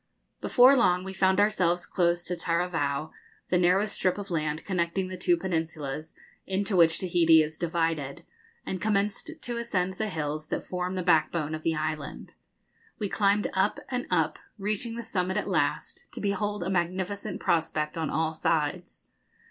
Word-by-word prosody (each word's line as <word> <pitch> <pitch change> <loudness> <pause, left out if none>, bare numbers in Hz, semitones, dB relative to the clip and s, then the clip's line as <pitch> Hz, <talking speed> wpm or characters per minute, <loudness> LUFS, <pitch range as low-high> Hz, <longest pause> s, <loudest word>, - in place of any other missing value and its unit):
Before 255 +2 +6
long 180 -8 +3
we 190 0 -6
found 190 0 +3
ourselves 180 -4 +2
close 175 -1 +1
to 180 - -2
Taravao, 165 -4 -1 0.4
the 180 - +4
narrow 180 +3 +4
strip 190 -3 0
of 200 -2 -7
land 155 -1 -2
connecting 185 0 -1
the 185 - -5
two 175 -1 +2
peninsulas 160 -4 -3 0.3
into 195 +1 -1
which 165 -2 +5
Tahiti 165 -3 +5
is 155 +1 -6
divided, 165 -4 -2 0.4
and 185 -2 -4
commenced 205 -1 0
to 240 -1 -3
ascend 190 -6 -1
the 215 -1 -1
hills 155 -2 -3
that - - -3
form 180 0 -3
the 185 - -2
backbone 160 -2 +2
of 155 - -4
the 160 0 0
island. 155 -2 -4 0.6
We 205 -3 -2
climbed 205 +1 +2
up 195 +2 +1
and 250 0 -2
up, - - +1 0.2
reaching 215 +3 -2
the 235 - -5
summit 190 -3 -1
at - - -1
last, - - -1
to - - -5
behold 205 0 -1
a 185 - -2
magnificent 185 +3 -2
prospect 155 -2 0
on 160 -3 -2
all 160 0 0
sides. 160 +2 -2
180 Hz, 165 wpm, -28 LUFS, 160-195 Hz, 0.6 s, Before